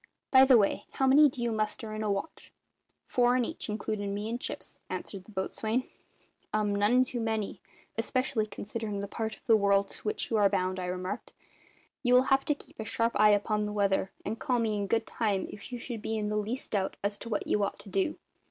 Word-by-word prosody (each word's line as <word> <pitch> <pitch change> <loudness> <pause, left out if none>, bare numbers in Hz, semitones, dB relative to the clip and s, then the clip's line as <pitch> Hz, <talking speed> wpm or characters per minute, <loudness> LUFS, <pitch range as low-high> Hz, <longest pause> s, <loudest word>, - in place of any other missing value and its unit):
By 265 0 +8
the 260 -2 +7
way, 200 -3 +1
how 265 - +1
many 285 +3 +7
do 250 -2 -5
you 235 - +1
muster 215 0 -2
in 215 - -4
a 210 -1 0
watch?" 200 +11 -4 0.5
"Four 245 0 +3
in 245 - +2
each, - - -5
includin' 210 -1 -2
me 210 +2 -3
and 240 +2 -3
Chips," - - -6
answered 190 -2 -5
the 215 - -14
boatswain. 220 +5 -1 0.7
"Um! 210 -1 +1
none 210 +5 +4
too 245 -1 -4
many, 220 -4 -2 0.4
especially 230 -1 0
considering 210 -1 -4
the 200 - -4
part 220 +1 -3
of - - -26
the 225 - +6
world 200 -1 +3
to - - -9
which 210 - -2
you 225 - +3
are 205 -1 +5
bound," 185 -1 0
I 180 - -3
remarked. 180 +1 -4 0.7
"You 250 -1 +4
will 250 - +7
have 270 0 +3
to 295 - +2
keep - - -17
a - - -2
sharp 230 +2 0
eye 210 0 +7
upon 210 +1 +2
the 210 - -4
weather, 195 -2 +1
and 220 +2 -3
call 250 - +1
me 225 -2 +1
in 200 -1 -1
good 225 +2 +1
time 205 -4 -1
if 205 +4 -10
you 245 - -3
should 235 -2 -6
be 220 +1 -2
in 210 -1 -1
the 210 - -1
least 220 +5 -3
doubt 195 -3 0
as 205 0 -1
to 230 - -7
what 215 - -1
you 210 - +1
ought 200 - -2
to 200 0 -12
do. 195 +10 0
215 Hz, 230 wpm, -30 LUFS, 200-235 Hz, 0.7 s, By